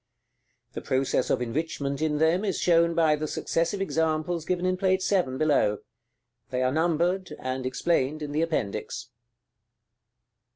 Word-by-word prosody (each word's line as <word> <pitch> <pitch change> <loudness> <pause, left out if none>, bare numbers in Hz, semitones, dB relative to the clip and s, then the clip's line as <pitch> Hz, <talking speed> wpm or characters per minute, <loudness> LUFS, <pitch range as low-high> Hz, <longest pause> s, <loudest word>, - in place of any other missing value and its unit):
The - - -5
process 130 -1 0
of - - +1
enrichment 140 +2 -3
in 155 -1 +1
them 160 +5 +2
is 195 -3 -1
shown 170 -1 +3
by 160 -2 +4
the 155 +1 -3
successive 170 +6 -1
examples 160 -1 -1
given 180 +1 -1
in 185 0 +2
Plate 185 0 +1
VII., 175 -10 +1
below. 135 -9 +2 0.7
They 130 -1 -1
are 130 - +2
numbered, 170 +2 0
and 130 0 -3
explained 155 +1 0
in 145 - -5
the 150 +2 0
Appendix. 125 -6 -3
155 Hz, 140 wpm, -26 LUFS, 135-175 Hz, 0.7 s, by